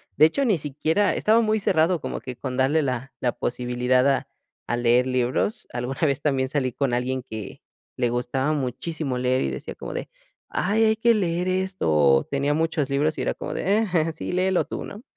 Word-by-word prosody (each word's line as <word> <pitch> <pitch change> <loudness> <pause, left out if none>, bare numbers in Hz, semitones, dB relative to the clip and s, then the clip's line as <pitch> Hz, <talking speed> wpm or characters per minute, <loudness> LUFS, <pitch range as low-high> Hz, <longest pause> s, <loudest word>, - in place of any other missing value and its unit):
de 155 - +7
hecho, 265 - +1
ni 205 -7 +3
siquiera 155 +7 0
estaba 220 +2 +3
muy 220 -1 +1
cerrado 170 -3 +2
como - - -4
que 130 -1 -7
con 130 0 -5
darle 140 +4 +3
la 130 -1 -3
la 125 - 0
posibilidad 125 +1 +1
a 135 - 0 0.4
a 120 - -1
leer 120 +1 +3
libros. 130 - -1
Alguna 125 +2 -4
vez, 140 -3 +1
también 135 -3 +1
salí 135 -3 0
con 140 -3 0
alguien, 130 +1 -1
que 110 -3 -7 0.4
le 120 -2 +1
gustaba 130 +4 -1
muchísimo 140 0 -3
leer 130 +1 +1
y 70 - -1
decía 65 - -6
como - - -7
de: - - -5 0.4
"Ay, 215 +4 +1
hay 220 0 +3
que 230 +2 +3
leer 180 -3 0
esto", 185 - -1
o 70 -3 +4
tenía 140 +1 0
muchos 160 -3 0
libros 145 +3 +1
y - - -2
era - - 0
como - - -5
de: 200 +3 +1
"Eh, 165 -1 +2
sí 155 - -5
léelo 185 0 +1
tú", - - -5
¿no? 210 +3 -10
140 Hz, 200 wpm, -24 LUFS, 125-180 Hz, 0.4 s, de